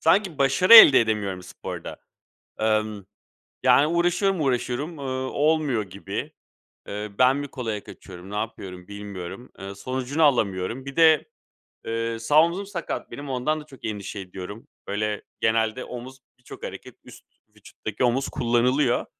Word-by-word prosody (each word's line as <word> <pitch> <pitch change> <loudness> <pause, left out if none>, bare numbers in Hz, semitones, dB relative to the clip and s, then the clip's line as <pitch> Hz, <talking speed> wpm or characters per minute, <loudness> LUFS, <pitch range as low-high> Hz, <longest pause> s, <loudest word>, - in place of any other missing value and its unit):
sanki 175 0 +2
başarı 140 +11 +5
elde 150 -11 +11
edemiyorum 105 -5 -1
sporda. - - -8 0.6
Emm, 110 -2 0 0.6
yani, 145 - +5
uğraşıyorum, 175 +2 +1
uğraşıyorum, 135 +4 -1
ııı, 130 -1 -3
olmuyor 150 -6 +1
gibi, 100 - -6 0.6
eee, 105 +1 -5
ben 130 +2 +5
mi 145 0 -4
kolaya 115 -6 -5
kaçıyorum, 95 0 -12
ne 105 - -5
yapıyorum 95 -4 -6
bilmiyorum. 100 +2 -8
Iıı, 100 0 -7
sonucunu 130 +7 -2
alamıyorum. 115 -2 +1
Bir 140 - -7
de, 160 - +5 0.6
eee, 115 0 -2
sağ 145 +7 +5
omuzum 180 +4 -2
sakat 180 -5 -5
benim, 145 0 -7
ondan 140 +5 -1
da - - -14
çok 135 -4 -12
endişe 105 -1 -5
ediyorum. 95 +7 -9 0.2
Böyle, 105 +1 -2 0.2
genelde 110 +2 +1
omuz, 130 +2 -9 0.2
birçok 125 - -12
hareket - - -8
üst - - -15 0.3
vücuttaki 105 +2 -6
omuz 125 +3 +1
kullanılıyor. 120 +2 +1
125 Hz, 140 wpm, -24 LUFS, 105-145 Hz, 0.6 s, elde